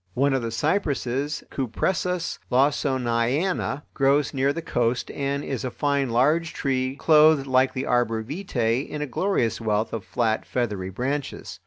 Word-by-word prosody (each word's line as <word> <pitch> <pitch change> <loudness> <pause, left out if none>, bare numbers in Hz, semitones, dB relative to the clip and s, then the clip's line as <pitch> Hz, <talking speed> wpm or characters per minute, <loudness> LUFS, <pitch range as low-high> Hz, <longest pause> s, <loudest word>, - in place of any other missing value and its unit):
One 140 +2 +2
of 135 - +1
the 115 - -3
cypresses 145 - -1
(Cupressus 175 - -1
Lawsoniana) 135 +4 +1
grows 140 +2 +2
near 135 0 +2
the 165 +3 -5
coast 120 -4 -1
and 140 0 -2
is 135 -4 -4
a 130 - -2
fine 140 0 0
large 150 +8 +2
tree, 130 -1 -1
clothed 155 -1 +5
like 130 0 +2
the 130 - -3
arbor 115 -2 +1
vitae 125 - -1
in 150 0 -5
a - - -1
glorious 120 - 0
wealth 110 0 0
of 115 -4 -3
flat, 110 +4 0
feathery 105 -7 -2
branches. 135 +8 -4
135 Hz, 150 wpm, -24 LUFS, 120-145 Hz, -, clothed